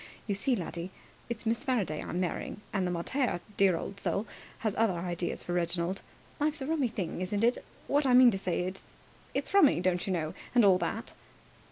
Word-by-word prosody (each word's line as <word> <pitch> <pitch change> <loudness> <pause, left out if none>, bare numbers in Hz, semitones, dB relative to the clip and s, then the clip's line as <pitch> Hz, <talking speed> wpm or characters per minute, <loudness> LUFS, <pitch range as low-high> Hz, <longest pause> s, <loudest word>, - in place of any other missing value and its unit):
You 205 - -1
see, 245 +6 +1
laddie, 175 -2 -4 0.4
it's 235 0 -4
Miss 230 +2 0
Faraday 220 - 0
I'm 175 - -3
marrying, 180 +2 -2
and 190 -2 +1
the - - -1
mater 180 +6 0 0.2
dear 195 -4 +4
old 195 +4 -6
soul 200 +2 -1 0.4
has 215 - +2
other 215 -5 +2
ideas 175 0 -3
for 175 - -3
Reginald. 175 +1 -1 0.4
Life's 300 +1 +1
a - - -3
rummy 300 -3 +1
thing, 190 -6 -4
isn't 200 +3 -1
it! 240 +2 +2 0.2
What 285 0 +2
I 250 - +5
mean 250 -1 +9
to 195 - -2
say 185 -2 -1
is, 185 +2 -6 0.4
it's - - -2
rummy, 360 - +6
don't 180 0 0
you - - 0
know, 160 -4 -1 0.2
and 240 -3 +7
all 185 -2 +6
that." 225 +4 -3
195 Hz, 200 wpm, -30 LUFS, 175-240 Hz, 0.4 s, mean